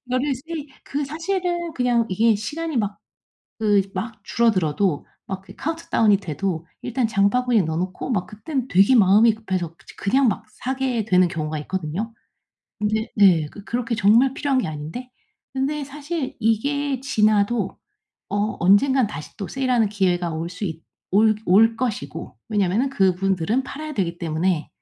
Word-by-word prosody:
이거를 255 +3 0
세일 310 +3 -6 0.2
그 285 +1 -2
사실은 345 +2 -2
그냥 240 -2 +2
이게 220 +3 +3
시간이 305 +8 -4
막 205 -2 -2 0.6
그 205 -2 +4
막 210 +2 -5
줄어들어도 185 -8 +1 0.2
막 190 -1 -4
그 195 +1 -14
카운트다운이 270 -10 +1
돼도 170 -2 -3 0.2
일단 245 -1 0
장바구니에 220 +2 +2
넣어 160 0 -2
놓고 185 +8 -3
막 180 -5 -1
그때는 255 +6 -4
되게 195 +7 +5
마음이 215 +2 +6
급해서 185 -6 -3
저 165 - -25
그냥 260 +7 +2
막 215 +2 -4
사게 255 -4 -2
되는 185 -3 +4
경우가 155 -3 -3
있거든요. 190 +7 -4 0.7
근데 220 +1 0
네 180 -7 +5
그 205 - -11
그렇게 235 +1 -2
정말 230 +6 +4
필요한 275 -3 0
게 - - -2
아닌데. 155 +12 -6 0.5
근데 285 +2 -1
사실 290 +1 -5
이게 275 +5 0
지나도 215 -3 +1 0.5
어 205 +2 -1
언젠가 225 +7 +4
다시 160 -7 -9
또 195 - -4
세일하는 250 -5 +1
기회가 180 -4 +1
올 165 +2 -3
수 180 +4 -6
있 165 -3 -5 0.3
올 215 +2 +5
올 225 +5 +5
것이고 210 - -4
왜냐하면은 210 +5 +1
그분들은 195 +1 +1
팔아야 300 +2 -6
되기 175 -4 -2
때문에 165 0 -1
215 Hz, 330 characters per minute, -22 LUFS, 185-260 Hz, 0.7 s, 마음이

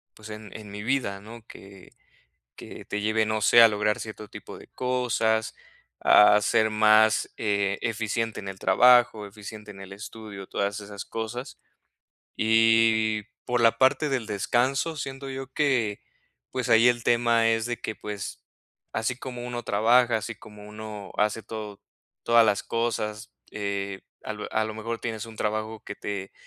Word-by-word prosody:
pues, 110 0 -11
en 105 -1 -9
en 105 -2 -11
mi 105 0 -7
vida, 115 -5 -1
¿no? 115 +1 -12
Que 95 -1 -14 0.6
que - - -11
te 105 - -4
lleve, 110 +1 +1
no 110 0 -1
sé, 120 +2 +6
a 115 - +10
lograr 105 -1 0
cierto 110 -1 -8
tipo - - -10
de - - -14
cosas, 115 -3 0 0.4
a 105 0 +6
ser 110 +1 +2
más, 110 0 +4
eh, 100 -2 0
eficiente 115 0 -2
en 100 - -7
el 95 0 -8
trabajo, 120 +1 +5
eficiente 105 +1 -10
en 95 - -13
el 95 0 -10
estudio, 105 -1 -9
todas 100 +2 -2
esas 100 0 -8
cosas. 115 +3 -6 0.8
Y 110 -1 +3 0.2
por 120 -1 +1
la 115 0 +4
parte 135 +3 +3
del 130 -5 -1
descanso, 125 - 0
siento 135 0 -6
yo 135 0 -5
que, 125 -9 0 0.5
pues, 125 -2 -3
ahí 115 +1 +6
el 120 -1 0
tema 115 -1 +3
es 115 -1 +1
de 120 -1 -3
que, 110 - -4
pues, 105 -2 -7 0.5
así 110 +2 -1
como 125 -2 -7
uno 120 -1 -4
trabaja, 115 +3 +3
así 110 +1 -4
como 105 -1 -14
uno 105 -2 -8
hace 105 +1 0
todo, 105 -2 -7 0.4
todas 115 -1 +6
las 105 -2 +1
cosas, 110 -2 -3 0.2
eh, 100 -1 -3 0.2
a - - -4
lo 105 0 -7
a 110 - +1
lo 110 0 -5
mejor 115 +1 -4
tienes 110 -2 -5
un 115 -1 -12
trabajo 110 +1 -3
que 105 - -6
te 100 -2 -6
110 Hz, 165 wpm, -26 LUFS, 105-115 Hz, 0.8 s, a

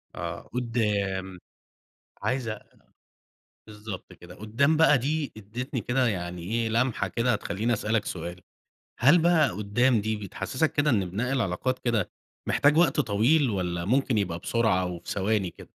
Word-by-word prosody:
آه 85 0 -5
قدّام. 100 -6 -1 0.8
عايز 125 -4 -1 1.2
بالضبط 105 -3 -8
كده. 90 +1 -13
قدّام 130 +9 +1
بقى 155 -3 +6
دي 145 +3 -1
ادِّتني 120 +4 -5
كده 125 +3 +1
يعني 90 -4 -3
إيه، 115 +4 -1
لمحة 115 -3 +1
كده 120 +6 0
هتخلّيني 105 +3 -1
أسألك 110 0 0
سؤال، 85 +1 -6 0.6
هل 145 +8 +6
بقى 160 -6 +4
قدّام 105 +5 +1
دي 110 +1 -1
بتحسّسك 130 - -2
كده 145 0 +2
إن 95 -6 +1
بناء 120 +8 -2
العلاقات 125 +1 -1
كده 115 -6 0 0.4
محتاج 145 +2 +3
وقت 165 -5 +4
طويل، 120 +6 +3
والّا 90 -3 -2
ممكن 125 +1 +1
يبقى 85 -4 -1
بسرعة 110 -3 +1
أو 90 -1 -3
في - - -9
ثواني 100 -2 0
كده؟ - - -15
110 Hz, 145 wpm, -27 LUFS, 95-130 Hz, 1.2 s, بقى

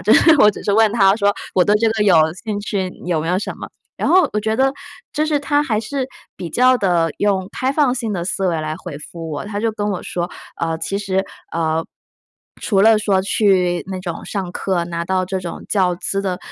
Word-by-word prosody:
就 - - +4
是 325 - +6
我 210 - +7
只 - - -10
是 200 - +1
问 220 0 +4
它 195 -3 +5
说 205 -2 +2 0.2
我 185 - +5
对 205 +3 +3
这 225 +1 +2
个 220 -1 0
有 190 -5 +5 0.3
兴 210 -2 -2
趣， 195 -2 -2 0.2
有 170 -3 0
没 165 - -3
有 180 +1 +2
什 210 - -4
么 - - -7 0.3
然 - - 0
后 370 +1 +5
我 210 - 0
觉 220 +1 -1
得 270 0 +3 0.4
就 305 +1 0
是 300 -2 +1
它 290 0 +1
还 225 -7 0
是 260 +4 -3 0.3
比 175 - -6
较 255 +7 +4
地， 170 -4 +2
用 195 -2 0
开 260 +1 -1
放 280 -3 +2
性 225 -5 -3
的 170 -1 -3
思 190 0 -1
维 165 -2 0
来 155 0 -3
回 175 -7 -7
复 165 +2 -8
我， 145 - -4
它 205 0 -4
就 225 0 +1
跟 210 -1 -2
我 185 - -3
说， 175 0 -3 0.3
呃， 165 -1 -1
其 195 +4 -3
实， 190 -1 0 0.3
呃， 160 -1 0 0.8
除 195 -4 +1
了 220 0 +6
说 195 -3 +2
去 185 -4 +2
那 190 -1 -4
种 175 -3 -6
上 190 -4 -4
课， 180 -3 -1
拿 170 0 -3
到 185 +1 0
这 190 0 -3
种 175 -2 -7
教 185 -3 +2
资 195 +3 -2
的， 185 -2 -2
195 Hz, 245 characters per minute, -19 LUFS, 175-220 Hz, 0.8 s, 我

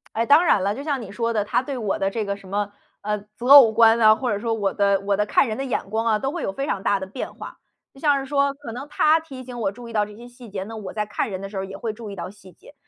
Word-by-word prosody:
哎， 230 - +1
当 295 +7 +6
然 195 - +3
啦， 200 +1 +1
就 275 - -7
像 285 -3 -2
你 200 -4 -9
说 230 +2 -1
的 210 -2 +1
他 205 - 0
对 270 0 -5
我 215 -5 -2
的 195 - +1
这 220 +2 -3
个 200 0 -3
什 195 - -15
么， 205 +1 -2 0.3
呃， 210 +1 -1 0.2
择 245 +3 -6
偶 270 -6 +9
观 225 +1 +5
啊， 215 -1 +7
或 245 0 -2
者 205 - -1
说 230 +1 -1
我 205 -3 -1
的 200 -1 +2
我 200 0 0
的 210 - +1
看 210 - +3
人 220 -2 -4
的 270 - -3
眼 250 -6 -3
光 220 +2 -1
啊， 220 -2 +3
都 270 +6 -2
会 340 0 -5
有 195 - -3
非 275 +6 -3
常 200 - -2
大 200 0 +1
的 - - -3
变 200 +7 -6
化。 - - -10 0.4
就 270 - -16
像 290 -1 +3
是 270 - -5
说 280 0 +1
可 280 -4 -9
能 255 +5 -7
他 305 +2 +3
提 270 -5 -10
醒 245 -1 -8
我 195 -3 0
注 240 +2 -11
意 230 - -10
到 210 -1 +2
这 210 0 -12
些 235 +3 -12
细 245 -1 -13
节 190 -1 -4
呢， 220 +2 -8
我 200 -3 -7
在 210 -1 -2
看 210 +2 -3
人 190 -1 -5
的 195 - -6
时 200 - -7
候 190 - -2
也 195 0 -9
会 225 +1 -3
注 220 -1 -9
意 - - -7
到 185 - -6
细 190 -2 -16
节。 - - -18
225 Hz, 355 characters per minute, -23 LUFS, 200-260 Hz, 0.4 s, 偶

